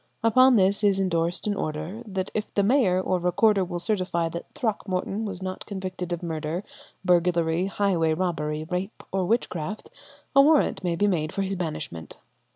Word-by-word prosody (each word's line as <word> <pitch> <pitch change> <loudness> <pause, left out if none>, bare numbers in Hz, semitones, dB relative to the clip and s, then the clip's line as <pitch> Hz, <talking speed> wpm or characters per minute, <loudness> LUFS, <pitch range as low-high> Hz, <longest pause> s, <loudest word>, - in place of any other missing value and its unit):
Upon 255 +3 +6
this 200 0 +3
is 200 -2 +3
endorsed 170 -2 0
an 210 - +1
order 155 +4 -4
that 190 -2 -3
if 215 0 -3
the 200 - +3
mayor 205 -5 +3
or 185 -1 0
recorder 190 +3 +3
will 175 -1 -4
certify 175 -3 0
that 170 +1 -7
Throckmorton 200 -1 -2
was 190 -3 -5
not 185 0 -5
convicted 185 -3 -5
of 175 0 -3
murder, 165 +2 -3 0.4
burglary, 175 0 +2
highway 180 -6 +1
robbery, 155 -4 -2
rape, 180 +5 -4
or 190 -1 0
witchcraft, 200 -3 -2 0.4
a 275 - +9
warrant 295 -7 +3
may 175 -2 0
be 205 - +2
made 160 -6 0
for 195 - -1
his 195 0 -2
banishment. 155 - -5
185 Hz, 165 wpm, -25 LUFS, 170-200 Hz, 0.4 s, a